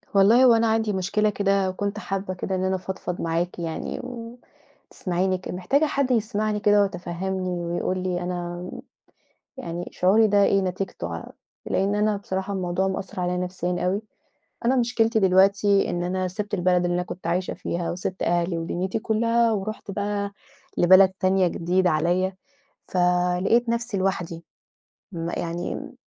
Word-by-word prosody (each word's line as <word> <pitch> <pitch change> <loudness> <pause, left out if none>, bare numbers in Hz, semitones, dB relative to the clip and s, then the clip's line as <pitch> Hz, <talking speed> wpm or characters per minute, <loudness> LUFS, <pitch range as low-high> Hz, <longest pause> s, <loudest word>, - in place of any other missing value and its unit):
والله 220 +6 +6
هو 240 - +7
أنا 230 0 +3
عندي 220 -1 +1
مشكلة 200 +3 +1
كده 195 -2 +1
وكنت 200 +2 -3
حابة 195 -2 -3
كده 190 +1 -3
إن 185 - -1
أنا 190 0 +1
أفضفض 185 -1 -5
معاكِ 170 +2 -1
يعني 165 -1 -4
و 240 -1 -8 0.5
تسمعيني 185 +1 -1
ك 180 - -10
محتاجة 190 - +1
حد 280 -3 0
يسمعني 215 -2 0
كده 205 0 +4
ويتفهّمني، 185 0 -2
ويقول 175 +1 -2
لي 180 -1 -1
أنا 175 0 -4 0.9
يعني 175 -9 -5
شعوري 205 +5 +4
ده 205 -1 +4
إيه 195 - +3
نتيجته 185 - -3
ع 85 - -7 0.4
لإن 195 +2 +1
أنا 210 0 +2
بصراحة 190 0 -4
الموضوع 185 0 0
مأثّر 190 -1 -4
عليَّ 180 0 0
نفسيًا 180 0 -2
أوي، 195 +4 0 0.6
أنا 255 +3 +3
مشكلتي 230 -2 +2
دلوقتي 195 +1 +4
إن 175 0 -2
أنا 185 +1 -1
سِبت 205 +3 -4
البلد 180 -1 +2
اللي 175 0 0
أنا 180 - 0
كنت 180 0 -8
عايشة 180 +2 -1
فيها 170 0 -3
وسِبت 180 +1 -4
أهلي 170 0 +1
ودنيتي 180 +5 -2
كلّها، 230 +1 +2
ورُحت 215 +1 -4
بقى 200 0 -2 0.5
لبلد 185 +2 +7
تانية 190 0 +3
جديدة 180 +2 +1
عليَّ، 175 +4 +1 0.6
ف - - -6 0.5
لقيت 235 +4 +3
نفسي 235 -1 -1
لوحدي 175 -3 -2 0.7
ما 170 0 -3
يعني 170 +1 -3
امم، - - -7
190 Hz, 155 wpm, -24 LUFS, 180-205 Hz, 0.9 s, هو